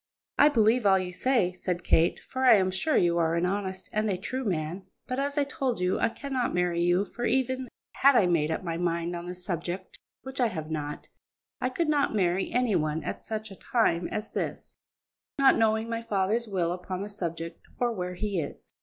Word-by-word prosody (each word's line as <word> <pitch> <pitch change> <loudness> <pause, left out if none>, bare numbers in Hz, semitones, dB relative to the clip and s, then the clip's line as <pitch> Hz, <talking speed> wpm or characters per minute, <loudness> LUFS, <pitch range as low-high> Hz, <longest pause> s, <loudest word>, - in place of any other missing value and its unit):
"I 295 - +8
believe 225 -3 +3
all 190 -1 +6
you 180 -1 -3
say," 215 -4 +2
said 180 -1 -3
Kate, 165 +1 +3
"for 260 0 -3
I 255 - +8
am 185 -2 +2
sure 190 +12 +1
you 170 -1 +3
are 165 0 +2
an 170 +1 +1
honest 190 0 -2
and 215 0 +1
a 190 - 0
true 255 +8 -4
man, 175 -2 -3 0.2
but, 255 +1 -3
as 285 +1 -1
I 290 - +4
told 265 -4 -2
you, 180 0 +1
I - - +3
cannot 260 -2 -2
marry 175 -1 +1
you; 175 +3 +3
for, 240 +4 -5
even 260 +1 0 0.3
had 275 0 +5
I 205 - +5
made 165 -4 +2
up 160 - -2
my 165 -2 -3
mind 170 0 -1
on 170 0 -6
the 180 - -5
subject, 180 +1 -5 0.2
which 265 0 -4
I 245 - +4
have 160 -6 -5
not, 150 -1 -4 0.5
I 255 - +1
could 330 +5 -1
not 290 -6 +2
marry 185 -1 +1
any 245 -4 +2
one 155 +1 0
at - - -5
such 215 -1 -5
a - - -9
time 180 -6 +1
as 215 +1 -4
this, - - -5 0.6
not 275 -1 +6
knowing 220 0 +2
my 230 0 -2
father's 215 +2 0
will 180 -4 0
upon 180 +1 -4
the - - -5
subject 170 -4 -5 0.2
or 245 -1 +1
where 180 -3 -4
he 200 -1 -2
is." 145 - -9
190 Hz, 215 wpm, -28 LUFS, 175-235 Hz, 0.6 s, I